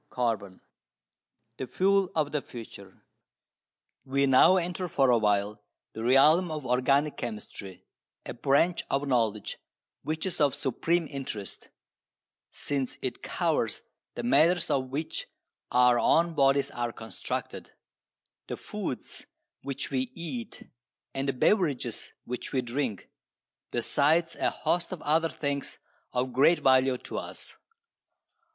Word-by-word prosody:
CHAPTER 115 -5 -1
III 95 - -19 1.0
THE 130 - -4
FUEL 195 +7 +2
OF 150 -2 +1
THE 150 -1 -1
FUTURE 100 -7 -11 1.0
We 140 +1 +1
now 135 +8 +6
enter 180 +1 -2
for 135 -5 +3
a 120 - +5
while 105 0 +1 0.3
the 110 - -5
realm 150 +8 +5
of 155 -3 -5
organic 135 +4 +2
chemistry, 100 -5 -6 0.4
a - - -5
branch 140 +8 +2
of 140 +1 0
knowledge 110 -5 0 0.4
which 155 +2 -2
is 185 -4 -2
of 145 -2 +3
supreme 165 +6 0
interest, 130 -9 -6 0.8
since 140 -3 -2
it - - -3
covers - - -1 0.3
the 120 - -4
matters 155 +8 +3
of 130 -2 0
which 150 +4 -3 0.4
our 125 -1 +5
own 170 +1 +3
bodies 140 -1 +3
are 120 -1 -2
constructed, 110 -4 -5 0.8
the - - -4
foods - - -4 0.3
which 140 +1 -4
we 130 -2 -1
eat 140 -9 -6 0.5
and 135 +1 -1
the - - +4
beverages 140 - +1
which 125 0 -5
we 130 -2 0
drink, 120 -3 -3 0.6
besides 155 +7 +2
a - - +1
host 175 +1 -1
of 185 - -6
other 160 +2 +2
things 140 -2 -3 0.3
of 125 0 -1
great 145 +7 +4
value 130 -1 +4
to - - -5
us. - - -5
135 Hz, 130 wpm, -28 LUFS, 120-155 Hz, 1.0 s, now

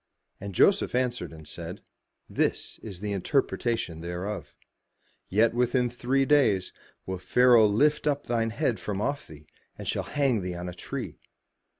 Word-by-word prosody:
And 100 -1 -7
Joseph 195 - +4
answered 125 -1 -1
and 80 -2 -12
said, - - -7 0.4
"This - - -1
is 100 -4 -9
the 105 -1 -3
interpretation 100 - -1
thereof: 90 +4 -5 0.7
Yet 110 +4 +3
within 125 0 +1
three 130 +3 +1
days 115 -11 +3 0.3
will 95 -1 -4
Pharaoh 120 +1 +5
lift 150 +9 +2
up 145 -1 0
thine 115 -1 0
head 120 0 0
from 100 -2 -3
off 140 +7 -2
thee, 75 -1 -13 0.3
and - - -7
shall - - 0
hang 135 -7 0
thee 90 -1 -4
on 90 +1 -5
a 90 - -5
tree." 90 - -6
115 Hz, 155 wpm, -27 LUFS, 95-125 Hz, 0.7 s, Pharaoh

